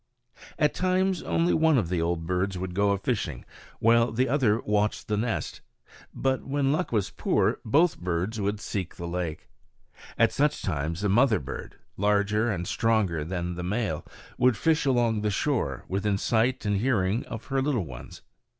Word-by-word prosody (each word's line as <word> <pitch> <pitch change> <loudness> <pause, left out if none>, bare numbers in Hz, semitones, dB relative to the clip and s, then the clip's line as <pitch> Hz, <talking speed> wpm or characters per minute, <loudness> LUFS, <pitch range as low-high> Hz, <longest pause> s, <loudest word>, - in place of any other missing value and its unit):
At 150 -1 +2
times 185 0 +1
only 170 +1 +1
one 160 -2 +4
of 95 -9 0
the 90 -2 0
old 85 0 -1
birds 90 +2 -1
would 90 0 -4
go 100 +2 +2
a 100 - +2
fishing, 95 - -3 0.3
while 115 0 +4
the 125 +4 +1
other 125 -6 +2
watched 105 0 0
the 105 - 0
nest. 115 +2 -2 0.5
But 130 -1 -1
when 135 0 0
luck 175 +5 -1
was 105 -5 0
poor - - +1
both 155 +8 +3
birds 90 +5 -2
would 100 +1 -1
seek 95 -4 -4
the 85 - -6
lake. 85 -3 -4 0.7
At - - +4
such 145 +1 0
times 80 0 -2
the 105 - +1
mother 115 +2 +4
bird, 70 -3 -7 0.2
larger 105 +2 +2
and 90 -3 -3
stronger 105 -9 +1
than 90 +1 -3
the 90 - -5
male, 95 -3 -2 0.4
would 125 -3 +4
fish 160 +1 +1
along 120 -4 +2
the 105 - 0
shore, 105 - -1
within 100 +1 0
sight 115 +4 +1
and 105 -1 +1
hearing 110 -2 +1
of 110 - -7
her 135 - +2
little 130 - 0
ones. 65 -5 -10
105 Hz, 175 wpm, -27 LUFS, 90-125 Hz, 0.7 s, one